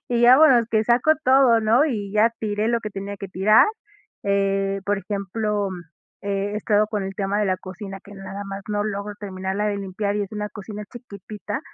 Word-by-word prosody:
Y 240 -1 +1
ya 245 +2 +8
bueno, 265 -7 +6
que 220 -1 +3
saco 240 +7 +4
todo, 260 -3 +5
¿no? 225 +6 +4
Y 210 -8 -3
ya 215 +2 +4
tiré 210 0 -1
lo 235 0 +1
que 215 - -5
tenía 200 0 -6
que 195 0 -7
tirar, 195 +4 +5 0.6
eh, 195 0 0
por 205 0 0
ejemplo, 205 +1 -2 0.5
he 200 +1 -2
estado 210 0 +2
con 210 -3 -2
el 195 0 -5
tema 195 0 -1
de 210 - +1
la 185 -1 +1
cocina, 195 +1 -8
que 205 - -14
nada 195 +1 -7
más 195 0 -6
no 205 -1 0
logro 205 0 -4
terminarla 190 +1 -3
de 205 - -1
limpiar 200 +1 -3
y 210 - 0
es 200 +1 -7
una 210 0 -3
cocina 210 0 -8
chiquitita, 215 -1 -7
205 Hz, 200 wpm, -23 LUFS, 195-220 Hz, 0.6 s, ya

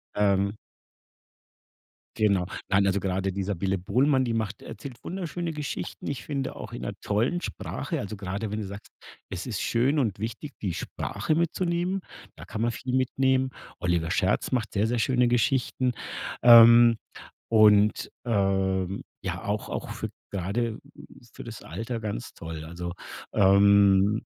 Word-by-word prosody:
ähm 100 0 +2 1.6
Genau. 100 -4 +2 0.2
Nein, 100 0 +3
also, 100 +1 +2
grade 95 0 -1
die 95 +1 -3
Sabine 95 0 -1
Bohlmann, 130 +8 +2
die 115 - -1
macht 110 -2 -3
erzählt 135 -4 -9
wunderschöne 175 -2 -4
Geschichten. 150 -2 -5
Ich 140 - -4
finde 140 -3 -3
auch - - -8
in 120 - -6
'ner 100 - -4
tollen 115 +12 0
Sprache. - - -4
Also, 105 +1 -5
grade 100 +3 -4
wenn 105 - -2
du 105 - -4
sagst: 100 +1 -9 0.4
„Es - - -5
ist - - -3
schön 130 +6 +2
und 110 -8 0
wichtig, 115 +6 -5
die 95 -5 -2
Sprache 155 - -2
mitzunehmen“, 175 +3 0 0.3
da - - -11
kann 110 - -5
man 120 +1 +2
viel 125 +2 -5
mitnehmen. 130 0 +2 0.3
Oliver 85 -2 0
Scherz 95 +7 +1
macht 115 -4 -1
sehr, 105 +2 +2
sehr 120 - 0
schöne 125 +1 +2
Geschichten. 125 +1 +1 0.5
Ähm, 115 0 +9 0.5
und, 105 -1 +5 0.2
ähm, 95 -3 0 0.2
ja - - -4
auch - - -2
auch - - -4
für - - -5 0.2
grade 105 +5 -2 0.5
für - - -9
das 115 -1 -9
Alter 115 +1 -5
ganz 105 - -5
toll. 80 -2 -7
Also, 85 +2 -6 0.4
ähm, 100 +1 +5
110 Hz, 150 wpm, -27 LUFS, 100-125 Hz, 1.6 s, Ähm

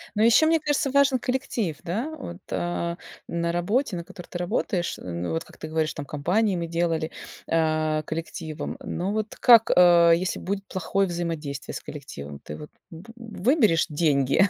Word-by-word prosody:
Ну, 215 - +3
ещё, 235 +7 +6
мне 325 0 +4
кажется, 290 -2 0
важен 280 -2 +4
коллектив. 245 - -2
Да 215 - -2
вот, 175 -10 -7
э, 170 0 -2 0.3
на 170 0 -1
работе, 200 +6 0
на 170 - -4
которой 175 0 -11
ты 175 - -5
работаешь, 180 0 -1
м, 85 -1 -5
ну, 85 - -2
вот 80 - -1
как - - -18
ты 155 - -7
говоришь, 155 0 -1
там 145 - -6
компании 185 +9 +1
мы 170 -1 -2
делали, 165 -1 -1 0.4
э, 155 -1 +1
коллективом. 160 -1 -5
Но 185 +3 -2
вот 215 +1 -3
как, 230 -2 +7
э, 170 -1 +7
если 185 +2 -2
будет 195 +1 -3
плохое 190 +2 0
взаимодействие 165 -5 -4
с - - -5
коллективом, 70 - -8
ты - - -8
вот, 150 - -9 0.2
б 170 +8 -11
выберешь 225 - +2
деньги 150 +3 +3
175 Hz, 175 wpm, -25 LUFS, 160-215 Hz, 0.4 s, как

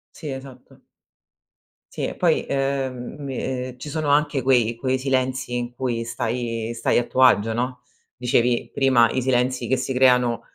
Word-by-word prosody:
Sì, 155 - -7
esatto. 135 -1 -10 1.2
Sì - - -2
e - - -6
poi, - - +2
ehm, 135 -2 -2
mi 135 -2 -5
ehm, 130 -1 -4
ci 140 - -9
sono 155 0 -2
anche 145 -1 +2
quei 120 -3 +2
quei 130 +2 0
silenzi 130 -1 -1
in 120 0 -5
cui 120 -2 -2
stai 115 0 -3
stai 115 - +1
a 120 - +3
tuo 130 - -1
agio, 115 -3 +5
no? 125 +2 -3 0.4
Dicevi 120 -1 +1
prima, 130 -4 +4
i 130 - -1
silenzi 125 0 0
che 130 - +2
si 130 +1 -3
creano 125 -2 +3
125 Hz, 165 wpm, -23 LUFS, 120-135 Hz, 1.2 s, agio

